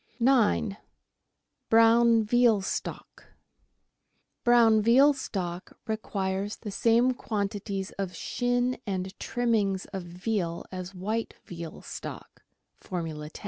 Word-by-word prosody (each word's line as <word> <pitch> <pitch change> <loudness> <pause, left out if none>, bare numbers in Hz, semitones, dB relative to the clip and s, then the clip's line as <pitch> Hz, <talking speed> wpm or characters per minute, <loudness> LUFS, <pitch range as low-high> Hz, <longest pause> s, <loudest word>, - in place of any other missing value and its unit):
9— 230 -5 +3 0.9
BROWN 230 0 +5
VEAL 230 -1 +3
STOCK - - -5 1.2
Brown 230 -3 +5
veal 260 +7 +6
stock 185 -9 -5
requires 200 -2 -2
the 210 - -7
same 235 +5 +3
quantities 200 -4 -3
of 185 -2 -3
shin 245 +5 -1
and 190 -1 -3
trimmings 215 -6 0
of 190 - -3
veal 175 0 -3
as 185 0 -7
white 215 +5 -3
veal 170 -2 -8
stock - - -8 0.4
(Formula 160 -5 -5
10). - - -11
210 Hz, 100 wpm, -28 LUFS, 185-235 Hz, 1.2 s, veal